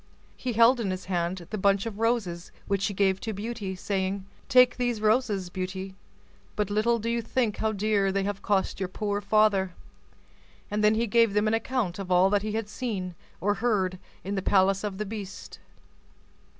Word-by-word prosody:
He 250 -2 -3
held 235 +3 +5
in 215 -4 -1
his 185 0 -4
hand 175 -1 -2
the 215 - -3
bunch 195 +1 +2
of 220 -2 -5
roses, 220 -7 -1
which 195 -1 0
he - - -2
gave 190 -1 +2
to 220 - -4
Beauty, 205 -2 -4
saying, 190 +1 -2 0.2
"Take 250 -1 +6
these 245 -3 0
roses, 215 -4 +1
Beauty; 190 +1 -4 0.6
but 210 -1 -1
little 225 +3 +2
do 230 0 -5
you 235 0 0
think 230 -2 -1
how 220 - 0
dear 205 -1 +1
they 195 0 0
have 200 0 -3
cost 195 -2 0
your 190 -2 -2
poor 205 +1 -2
father;" 200 -3 +2 1.0
and 210 +1 0
then 210 +1 +5
he 230 +2 +1
gave 230 -2 +3
them 210 +1 +3
an 215 - +1
account 225 -5 -1
of 195 -2 -5
all 180 +2 +5
that 205 -1 +3
he 215 0 -3
had 220 -1 -2
seen 210 -6 -4 0.3
or 205 +4 +1
heard 190 -6 +1 0.2
in 195 - -3
the 195 - -1
palace 195 +1 +3
of 205 -2 -3
the 215 - -3
beast. 205 -2 -8
205 Hz, 190 wpm, -27 LUFS, 190-220 Hz, 1.0 s, Take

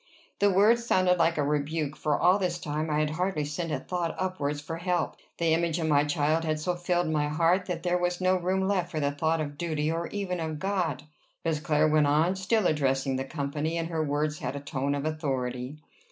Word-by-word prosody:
The 205 - +4
words 215 +5 +4
sounded 185 -5 +3
like 165 0 +3
a 145 - +2
rebuke, 150 +1 -1
for 150 -1 0
all 185 +3 +4
this 180 -2 -1
time 155 -1 -3
I 150 - +1
had 150 0 0
hardly 175 -2 -1
sent 160 +3 -3
a - - 0
thought 175 -2 -3
upwards 155 -6 -2
for 165 +3 -6
help. 175 0 -1 0.2
The 165 -1 +2
image 165 0 +1
of 165 - -1
my 145 -2 +3
child 150 +2 +1
had 155 -1 -1
so 180 +4 -1
filled 175 0 0
my 150 -2 +1
heart, 170 +5 +2
that 175 -3 -3
there 180 0 +1
was 175 0 -1
no 185 0 +3
room 185 +1 0
left 185 -3 0
for 160 - -3
the 145 -1 +1
thought 160 +3 0
of 145 -2 -4
duty, 155 -2 -1
or 165 +1 -2
even 190 -3 -3
of 160 -1 -3
God. 180 -6 -1 0.4
Miss 160 -2 +1
Clare 155 -1 +2
went 155 -1 +3
on, 155 +6 +3
still 190 +2 +1
addressing 135 -4 +1
the 135 - -3
company, 145 +3 -2
and 165 0 -2
her 160 -2 -1
words 150 +2 -1
had 130 -3 -4
a - - -3
tone 140 0 -2
of 140 +1 -3
authority. 135 -3 -3
160 Hz, 225 wpm, -28 LUFS, 150-180 Hz, 0.4 s, The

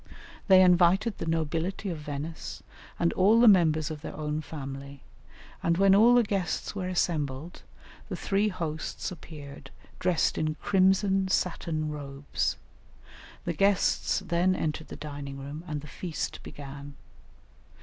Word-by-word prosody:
They 190 -2 +8
invited 180 +4 +4
the - - -4
nobility 165 +4 -1
of 165 - -5
Venice 150 +2 -6 0.3
and 170 - +1
all 205 +5 +5
the 240 - +7
members 160 -6 +4
of 150 -2 -6
their - - -7
own 150 0 -2
family, 140 -2 -8 0.6
and 170 0 +1
when 195 0 +5
all 230 +5 +7
the 245 - +6
guests 195 -5 -2
were 190 -3 -3
assembled 160 -4 -2 0.5
the - - -3
three 200 +2 +1
hosts 165 -5 -4
appeared 145 -5 -10 0.3
dressed 175 -3 +1
in 155 0 0
crimson 190 +1 +2
satin 165 -4 -1
robes; 140 -1 -3 0.9
the 170 - -1
guests 195 +2 +2
then 180 +2 +2
entered 155 -1 -3
the - - -8
dining 145 -2 -7
room, 140 +4 -7
and 150 -3 -3
the 150 - -11
feast 160 +4 -5
began. 140 0 -9
165 Hz, 140 wpm, -28 LUFS, 150-185 Hz, 0.9 s, They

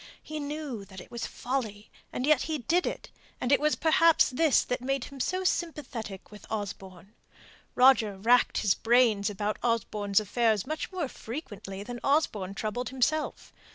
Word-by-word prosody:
He 310 0 -6
knew 285 -6 -5
that 190 -1 -11
it - - -13
was 235 - -4
folly 225 -5 -4 0.2
and 250 - -2
yet 300 -2 +4
he 315 - 0
did 330 +8 +1
it; - - -5 0.3
and 250 - -1
it 280 - +6
was 300 +1 +2
perhaps 330 -2 +4
this 300 +2 +3
that 250 - -3
made 270 0 -1
him 275 +1 -10
so 370 +8 -1
sympathetic 260 - -3
with 210 -2 -13
Osborne. 195 -2 -6 0.6
Roger 250 -6 +5
racked 240 +5 +3
his 200 -2 +3
brains 225 -3 +3
about 210 +1 -3
Osborne's 210 -4 +1
affairs 215 0 +1
much 310 +6 -4
more 360 -6 -2
frequently 205 -7 -7
than 240 +2 -7
Osborne 215 -10 +1
troubled 225 +4 -3
himself. 265 +4 -1
245 Hz, 160 wpm, -28 LUFS, 210-295 Hz, 0.6 s, it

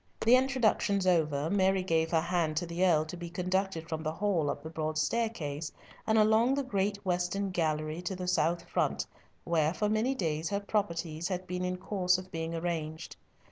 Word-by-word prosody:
The 235 +3 +6
introductions 245 -7 +2
over, 155 -5 +2
Mary 190 -1 +3
gave 165 -2 +1
her 165 -2 +2
hand 170 -3 0
to 175 - 0
the 170 +2 -2
Earl 160 -4 +4
to 155 - -7
be 175 -1 -7
conducted 180 -1 -1
from 160 -1 -3
the 155 0 -2
hall 175 -5 0
up 145 - -4
the 160 - -6
broad 155 -1 -2
staircase, 155 -6 -1 0.4
and 220 0 +3
along 220 +4 +4
the 280 - 0
great 200 -4 0
western 180 +2 0
gallery 155 -1 -1
to 180 +2 -3
the 180 0 -5
south 170 -1 +1
front, - - 0 0.4
where 160 0 +1
for 210 - 0
many 220 +5 +1
days 160 -6 -1
her 200 0 0
properties 170 -6 -2
had 185 0 -3
been 180 0 -3
in 180 0 -1
course 180 -1 +1
of 185 0 -9
being 165 -1 -3
arranged. 160 -1 -3
180 Hz, 190 wpm, -30 LUFS, 160-200 Hz, 0.4 s, The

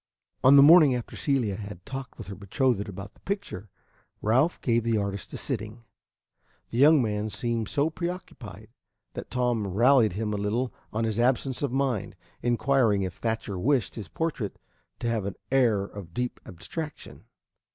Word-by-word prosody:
On 135 +2 +8
the 140 - +9
morning 150 -3 +8
after 120 - -6
Celia 125 -9 0
had 100 -4 -9
talked 135 -2 -7
with - - -8
her 100 - -7
betrothed 105 +2 0
about 100 +2 -8
the - - -25
picture, 195 - -5 0.5
Ralph 130 +11 +2
gave 115 -2 +1
the 115 -1 +1
artist 100 -1 -3
a - - -4
sitting. 110 -2 -4 0.9
The 115 - -2
young 150 0 +6
man 105 -1 -2
seemed 115 +1 -2
so 145 +3 +1
preoccupied 175 +2 -7 0.4
that - - -7
Tom 120 -4 0
rallied 115 +2 +4
him 105 +2 -2
a - - -1
little 110 +5 -1 0.2
on 110 +2 -1
his 110 0 -1
absence 130 +1 +1
of 140 -4 -1
mind, 130 -5 -1 0.3
inquiring 120 -4 +2
if 90 -1 -3
Thatcher 110 -3 -3
wished 125 -1 +1
his 105 -6 -7
portrait 125 - -3 0.4
to 120 - -3
have 115 -4 -1
an 100 - -4 0.2
air 120 -7 +3
of 100 -4 -10
deep 125 0 -2
abstraction. 150 - -7
115 Hz, 165 wpm, -27 LUFS, 105-135 Hz, 0.9 s, the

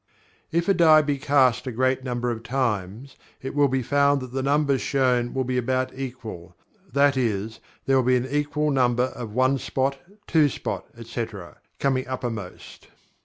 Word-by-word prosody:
If 170 +1 0
a 195 - +5
die 160 -3 +6
be 145 -2 -1
cast 130 -3 +2
a - - -2
great 130 +2 0
number 120 -1 -2
of 115 -1 -5
times, 115 -1 -3 0.2
it 135 - -6
will 145 -1 +4
be 130 -1 -1
found 140 +2 +3
that 130 -1 -8
the 135 - -1
numbers 140 0 +1
shown 125 -3 +1
will 130 - -1
be 125 0 -1
about 130 +1 -1
equal, 115 -10 -7 0.4
that 140 0 +3
is, 110 -3 -2 0.3
there 135 0 +3
will 130 - +3
be 125 +1 +3
an 125 0 0
equal 150 +2 -1
number 125 -2 +2
of 115 -4 -7
one 130 +1 +2
spot, 135 +2 -1 0.3
two 155 -3 +3
spot, - - -4
etc., 115 -5 -6 0.2
coming 130 -2 0
uppermost. 115 -7 -6
130 Hz, 170 wpm, -24 LUFS, 120-140 Hz, 0.4 s, die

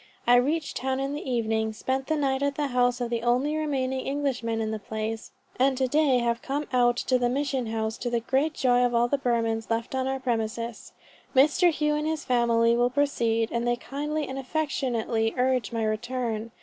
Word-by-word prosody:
I 245 - +6
reached 295 +5 0
town 265 0 -1
in 275 +1 -2
the 290 -2 -5
evening, 220 -2 0
spent 265 +4 -2
the 315 - +1
night 270 -2 0
at 280 0 0
the 290 -1 -1
house 245 0 +2
of 240 -1 -2
the 235 -1 -1
only 250 +6 +1
remaining 265 -4 -1
Englishman 265 -5 -1
in 220 -1 -1
the 220 - -3
place, 220 +1 -4 0.3
and 265 0 +3
to 260 0 +1
day 290 -1 +3
have 235 -1 0
come 285 +2 -2
out 240 -1 +4
to 255 0 +1
the 245 0 +1
mission 270 -2 -1
house, 220 0 -2
to 245 - -2
the 235 -1 +1
great 270 +6 0
joy 245 -2 +3
of 245 -1 +1
all 235 +1 +3
the 280 +3 0
Burmans 230 -3 0
left 230 +2 -2
on 260 0 -1
our 265 0 -1
premises. 230 -2 -3 0.4
Mr. 305 +6 +5
Hough 300 -1 0
and 300 - -2
his 315 -1 -2
family 235 -1 +3
will 240 +1 +3
proceed, 235 -5 +1
and 235 0 -1
they 240 - +2
kindly 295 +5 -3
and 265 +1 -5
affectionately 250 -6 -1
urge 250 -4 +1
my 230 -1 -1
return. 225 0 -2
250 Hz, 205 wpm, -26 LUFS, 230-275 Hz, 0.4 s, I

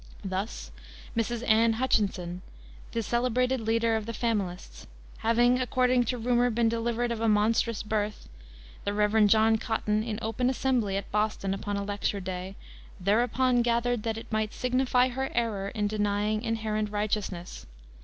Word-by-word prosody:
Thus 190 +3 -4 0.4
Mrs. 235 +1 -1
Anne 225 +1 +4
Hutchinson, 195 -7 0 0.5
the 230 - -2
celebrated 250 +2 +1
leader 225 +1 +1
of 220 -1 -3
the 230 - -4
Familists, 200 -6 -3 0.3
having, 240 +3 +3
according 250 -1 +2
to 250 +2 -1
rumor, 245 +1 +2
been 230 0 +2
delivered 235 +1 -1
of 230 -1 -3
a 230 - +2
monstrous 215 +1 +2
birth, 210 -1 -2 0.6
the 205 - -2
Rev. 210 0 +4
John 220 +1 +4
Cotton, 215 -2 0
in 220 -1 -3
open 240 +3 0
assembly, 245 -7 0
at 200 - -6
Boston, 210 -2 0
upon 205 +1 -3
a 200 - -2
lecture 205 0 -2
day, 185 0 -5 0.4
"thereupon 245 +5 +2
gathered 235 0 +1
that 225 0 -2
it 225 - -9
might 215 -1 -1
signify 255 0 +2
her 265 +2 -3
error 220 -5 0
in 210 0 -2
denying 210 0 0
inherent 215 -2 -1
righteousness." 205 -4 -3
225 Hz, 150 wpm, -28 LUFS, 210-240 Hz, 0.6 s, Anne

